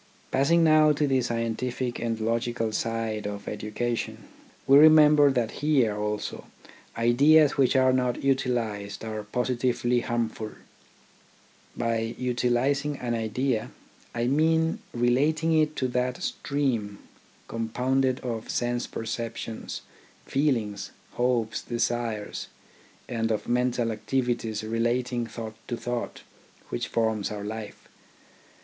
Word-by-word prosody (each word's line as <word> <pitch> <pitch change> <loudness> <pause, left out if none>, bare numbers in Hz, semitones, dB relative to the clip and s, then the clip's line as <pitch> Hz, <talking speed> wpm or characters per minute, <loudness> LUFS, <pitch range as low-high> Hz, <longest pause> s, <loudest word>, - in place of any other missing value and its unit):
Passing 165 +6 +3
now 155 -1 +6
to 150 +1 +1
the 135 -2 +2
scientific 120 +1 -2
and 115 -1 -2
logical 115 0 -1
side 115 -1 -2
of 100 0 -6
education, 120 +2 -3 0.4
we 135 +1 +7
remember 150 -1 +7
that 120 -4 0
here 135 -8 +3
also 105 0 -3 0.5
ideas 140 +6 +5
which 135 -1 +3
are 130 -1 +4
not 125 -1 0
utilised 115 -7 -1
are 110 -1 -4
positively 125 +2 0
harmful. 115 -3 -3 1.2
By 115 -1 -1
utilising 125 +4 0
an 120 -2 -2
idea, 115 +1 -1 0.5
I 120 0 0
mean 160 +4 +2
relating 145 +7 +2
it 155 -1 +2
to 130 - 0
that 125 0 -1
stream, 120 -8 -1 0.5
compounded 125 +3 0
of 115 -3 -4
sense 120 0 -1
perceptions, 115 0 -5 0.4
feel 140 -1 +2
ings, 100 -3 -5 0.2
hopes, 120 -3 0
desires, 120 -3 -2 0.6
and 115 -1 -1
of 110 - -2
mental 120 -1 +1
activities 110 -1 -1
relating 120 +2 -1
thought 115 -1 -7
to 120 - -3
thought, 120 0 -4 0.5
which - - -2
forms 110 -3 0
our 105 -1 -5
life. 110 0 -7
120 Hz, 115 wpm, -27 LUFS, 115-130 Hz, 1.2 s, we